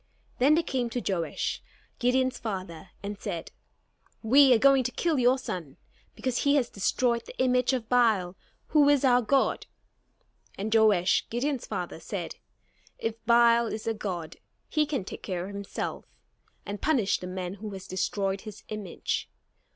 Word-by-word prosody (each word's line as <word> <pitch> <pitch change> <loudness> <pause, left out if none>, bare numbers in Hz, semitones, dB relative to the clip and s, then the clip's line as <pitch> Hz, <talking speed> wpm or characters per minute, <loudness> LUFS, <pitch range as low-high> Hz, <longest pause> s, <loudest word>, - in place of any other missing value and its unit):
Then 280 +5 +5
they 335 - +2
came 255 -6 -1
to 245 - -2
Joash, 170 -3 -2 0.4
Gideon's 255 +1 +1
father, 185 -5 -5
and 205 0 -5
said: 165 -2 -5 0.7
"We 265 +4 +6
are 245 - +7
going 270 +2 +5
to 250 - -1
kill 320 0 0
your 250 +1 +4
son 175 - -6 0.4
because 255 -2 -2
he 280 0 +3
has 255 -5 +1
destroyed 235 +4 0
the - - -11
image 250 -1 +2
of 250 -4 -2
Baal, 220 -7 +2 0.3
who 295 -2 +5
is 285 -2 +4
our 250 -1 +5
god." 270 +4 +1 0.9
And 215 +3 -2
Joash, 210 -4 +4
Gideon's 260 +2 -2
father, - - -4
said: - - -5 0.6
"If 225 0 -4
Baal 235 0 +5
is 215 0 -5
a 225 - 0
god, 175 -7 -5 0.3
he 305 -1 +1
can 275 -10 -2
take - - -8
care 180 -2 -3
of 200 - -8
himself, 200 0 -5 0.6
and 205 0 -6
punish 255 -10 +2
the 180 - -7
man 180 0 -4
who 210 +2 -7
has 190 0 -8
destroyed 195 +1 -1
his 215 -3 -10
image. 210 -4 -3
230 Hz, 160 wpm, -28 LUFS, 195-255 Hz, 0.9 s, are